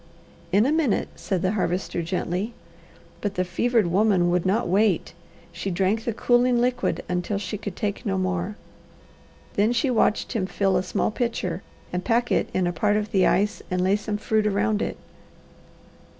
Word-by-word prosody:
"In 205 +4 +4
a 275 - +2
minute," 305 -8 +1
said 185 -2 -2
the 185 - +2
Harvester 180 -3 -1
gently. 180 +5 -2 0.7
But 205 -1 -2
the 185 - +1
fevered 225 +5 +1
woman 180 -1 +3
would 180 +1 +1
not 210 +5 +1
wait. 195 0 +2 0.4
She 170 +3 -4
drank 195 +5 0
the 235 - 0
cooling 245 +1 +3
liquid 245 0 0
until 180 +3 -1
she 205 +1 -4
could 205 -3 -6
take 205 +1 -3
no 195 -5 -1
more. 185 +2 -1 1.0
Then 210 +3 +2
she 245 +2 +1
watched 220 -2 +2
him 200 -6 -1
fill 195 +1 +1
a 180 - +3
small 185 +3 -1
pitcher 210 -7 -2 0.3
and 180 0 -1
pack 240 +1 +1
it - - +1
in 185 - 0
a 175 - 0
part 205 +4 +2
of 210 0 -3
the 190 -2 +4
ice 205 +1 +1
and 180 -1 0
lay 190 +2 +3
some 210 0 -3
fruit 215 0 +1
around 210 +1 +1
it. - - -2
200 Hz, 180 wpm, -24 LUFS, 185-220 Hz, 1.0 s, In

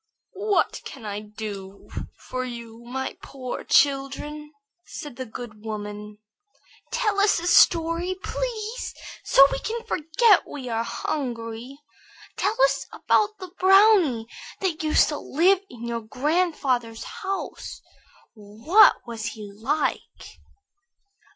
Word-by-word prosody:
"What 410 - +1
can 220 - -9
I 205 0 -3
do 210 -2 -8 0.3
for 255 0 -5
you, 235 -2 -8
my 265 +2 -4
poor 255 -2 -6
children?" 290 +2 +1 0.3
said 295 -7 -8
the 260 0 -6
good 220 -1 -9
woman. 210 -1 -6 0.7
"Tell 425 -4 +1
us 405 +1 +4
a 340 - -6
story, 340 +1 +4
please, 465 -1 -4 0.3
so 275 - +7
that 275 - +5
we - - -2
can 460 +1 -4
forget 355 +7 +3
we 260 -4 -7
are 225 -1 0
hungry. 235 -1 -4 0.6
Tell 445 +3 -1
us - - +2
about 425 0 +1
the 370 -2 -9
brownie 380 - +5 0.3
that 355 -5 -1
used 310 -1 +4
to 295 - -3
live 360 +6 +3
in 235 -1 -9
your 235 0 -3
grandfather's 255 -3 0
house. 390 -4 -6 0.5
What 225 - +4
was 230 -2 -6
he 210 -2 -8
like?" 265 +9 -3
275 Hz, 120 wpm, -25 LUFS, 230-365 Hz, 0.7 s, so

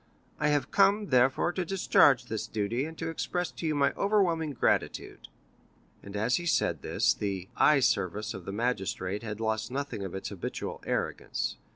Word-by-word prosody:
I 150 - +2
have 145 -2 +1
come, 200 +1 +3
therefore, 130 +5 +3
to 185 - -1
discharge 145 -8 +4
this 110 -1 -4
duty, 115 +5 -1
and 160 0 -8
to 165 0 -3
express 175 +2 -2
to 165 - -5
you 155 - 0
my 140 -1 +2
overwhelming 175 -7 +1
gratitude." 120 - -1 0.7
And 100 0 -10
as 110 +4 +2
he 175 - -4
said - - +1
this, - - +2
the 95 -2 -4
"eye 150 -2 +5
severe" 105 -5 +1
of 95 -2 -8
the - - -4
magistrate 105 -3 -2
had 105 -2 -6
lost 110 0 -1
nothing 135 -5 -4
of 95 -1 -5
its 95 - -4
habitual 100 -4 -5
arrogance. - - -2
125 Hz, 175 wpm, -29 LUFS, 105-160 Hz, 0.7 s, eye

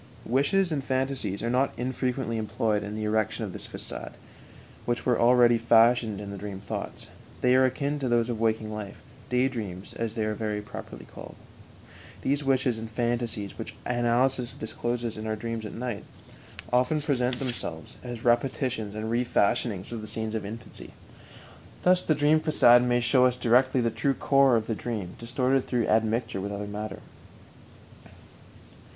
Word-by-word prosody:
Wishes 155 +9 +2
and 145 -3 -1
phantasies 130 -7 -1
are 115 - 0
not 130 +2 +2
infrequently 125 -1 -2
employed 110 0 0
in 105 +1 -5
the 110 - -3
erection 110 +1 0
of 95 - -7
this - - -7
façade, - - -7 0.7
which 120 0 -1
were 125 - +2
already 120 -1 +5
fashioned 115 -2 +4
in 100 -1 -6
the 100 - -6
dream 100 -1 -6
thoughts; 100 - -6 0.4
they 125 - +4
are 130 0 +6
akin 140 +3 -1
to 130 -3 -1
those 120 -1 +2
of 120 -2 -2
our - - -7
waking 110 -1 0
life 105 -2 -7 0.3
"day 125 +1 +3
dreams," 100 -7 -6
as 115 -1 -3
they 110 -2 0
are 110 - -1
very 105 -1 -2
properly 105 - -9
called. - - -11 0.9
These 140 +2 +1
wishes 130 -4 +1
and 110 0 -6
phantasies, 115 -3 -2
which - - -6
analysis 120 +1 +1
discloses 120 +1 -3
in 110 +1 -5
our 110 - -1
dreams 115 0 -4
at - - -9
night, 120 -3 -4 0.7
often 125 +5 +3
present 130 -4 0
themselves 115 - -5
as 120 -2 -6
repetitions 120 -3 +1
and 110 +1 -3
refashionings 115 -4 +1
of 115 -2 -4
the 110 - -7
scenes 110 0 -3
of 110 - -2
infancy. 110 +2 -9 0.9
Thus 180 0 +5
the 155 - +1
dream 150 +2 +4
façade 120 -6 +6
may 120 0 +2
show 125 +2 +5
us 125 0 -1
directly 125 +2 +3
the 115 -1 +1
true 125 +5 0
core 135 -2 +4
of 110 -1 +1
the 115 - -2
dream, 105 -5 -4
distorted 125 +3 0
through 120 -3 +1
admixture 110 -2 +1
with 100 +1 -4
other 100 0 -4
matter. 105 0 -6
120 Hz, 170 wpm, -27 LUFS, 110-125 Hz, 0.9 s, are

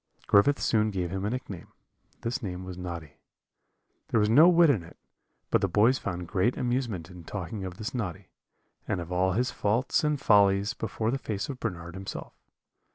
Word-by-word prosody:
"Griffith 105 +8 +4
soon 110 -1 +2
gave 90 -4 -3
him 95 0 -3
a - - 0
nickname 105 -7 -6 0.5
this 120 +4 -2
name 90 -4 -5
was 90 -1 -7
Noddy; 85 -4 -7 0.9
there 115 - +2
was 105 0 +2
no 155 +9 +8
wit 170 -3 +6
in 110 -10 0
it, 85 - -14 0.5
but - - +3
the 95 - +2
boys 110 +8 +3
found 90 -2 -4
great 105 +6 +1
amusement 120 -9 -2
in 90 -1 -11
talking 95 +3 -5
of 90 -1 -6
this 110 +4 -5
Noddy, 105 -9 -4 0.6
and 100 - -1
of 85 0 -7
all 90 +1 +2
his 125 +5 0
faults 115 +9 +1
and 150 -1 +1
follies, 100 -2 +4
before 110 -1 -2
the 135 - -1
face 105 -3 -4
of 130 -2 -5
Bernard 85 -7 -4
himself. 95 +1 -7
100 Hz, 185 wpm, -28 LUFS, 90-120 Hz, 0.9 s, no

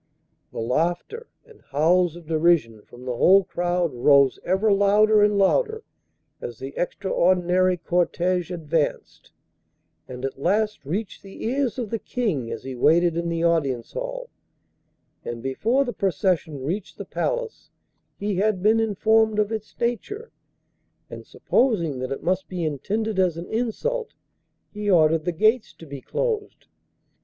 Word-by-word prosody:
The - - -11
laughter 170 - -2 0.2
and 455 -2 -19
howls 170 +4 +2
of 175 -1 -12
derision 155 -9 +1
from 120 +4 -14
the 125 -1 -3
whole 195 +10 +5
crowd 175 -3 -1
rose 140 +2 +4
ever 195 +4 +2
louder 210 +2 +4
and 205 0 +3
louder 445 - +2 0.6
as 120 - -6
the 135 +1 -7
extraordinary 185 -1 +1
cortege 175 +1 0
advanced, 165 -3 -3 0.8
and 125 +1 -6
at 135 0 -6
last 210 +6 0
reached 195 +9 -4
the 195 +1 -9
ears 260 +1 -1
of 235 -5 -4
the 225 - -1
King 185 - -2
as 115 - -6
he 130 - -6
waited 165 +6 +3
in 170 0 -2
the 165 0 -2
audience 140 -8 0
hall, - - -5 0.9
and 120 -1 -6
before 230 - +1
the 245 - -4
procession 175 -6 -1
reached 180 +9 -4
the - - -7
palace - - -3 0.5
he 205 -2 -2
had 200 -1 0
been 220 +2 +4
informed 220 0 +2
of 210 0 +1
its 215 -1 -6
nature, 415 - -3 0.8
and, - - -9
supposing 170 - 0
that 130 +1 -4
it 135 - -4
must 185 +1 0
be 180 -3 -3
intended 200 +8 -2
as 180 -3 +2
an 170 - -6
insult, 445 - -2 0.6
he 210 0 -3
ordered 160 -3 +4
the 175 - +1
gates 220 +7 +2
to 165 - -14
be 140 -3 -8
closed. 440 - -3
185 Hz, 150 wpm, -24 LUFS, 155-220 Hz, 0.9 s, whole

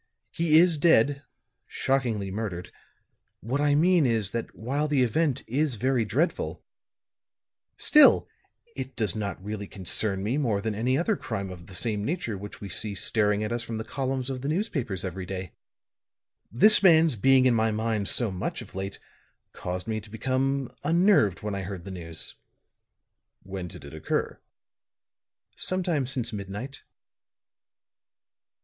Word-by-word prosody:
"He 165 -2 +3
is 170 -1 +5
dead 145 -3 +4 0.5
shockingly 120 -8 -1
murdered. 95 -4 -4 0.7
What 130 +7 -2
I 145 -1 +3
mean 170 -1 +4
is, 110 -5 0
that 115 -1 -4
while 140 +7 -1
the 145 -3 +2
event 140 +3 0
is 140 +1 0
very 125 +1 +1
dreadful 145 - -1 1.1
still, 300 -1 +6 0.5
it 135 - -6
does 105 -6 0
not 105 -2 -3
really 105 -1 -5
concern 95 +1 -1
me 120 +8 0
more 115 -8 +1
than 110 +1 -2
any 125 +5 +1
other 190 +7 +1
crime 100 - -4
of 85 -1 -11
the 95 - -7
same 105 +1 -1
nature 145 - -2
which 100 +1 -9
we 100 - -7
see 100 +2 -3
staring 105 +1 +1
at 105 - -3
us 120 0 -1
from 115 -1 -5
the 110 - -3
columns 130 +2 -3
of 130 -1 -5
the 140 - -4
newspapers 140 - -2
every 95 0 -5
day. 95 -2 -5 1.0
This 210 - +6
man's 165 -6 +5
being 130 +4 +4
in 125 - +5
my 110 -1 +2
mind 110 -1 -1
so 120 -5 +1
much 90 -1 -4
of - - -16
late 95 +1 -5 0.6
caused 90 +3 -5
me 110 -1 -2
to 105 - -15
become 130 +3 -1
unnerved 165 - +3
when 105 -1 -2
I 100 - -3
heard 95 -1 -6
the 100 - -7
news." 85 -3 -6 1.1
"When 95 -2 -6
did 80 - -11
it 70 - -10
occur?" 80 - -2 1.2
"Sometime 175 -8 -1
since 120 -3 -3
midnight." 105 +7 -6
115 Hz, 155 wpm, -27 LUFS, 100-140 Hz, 1.2 s, still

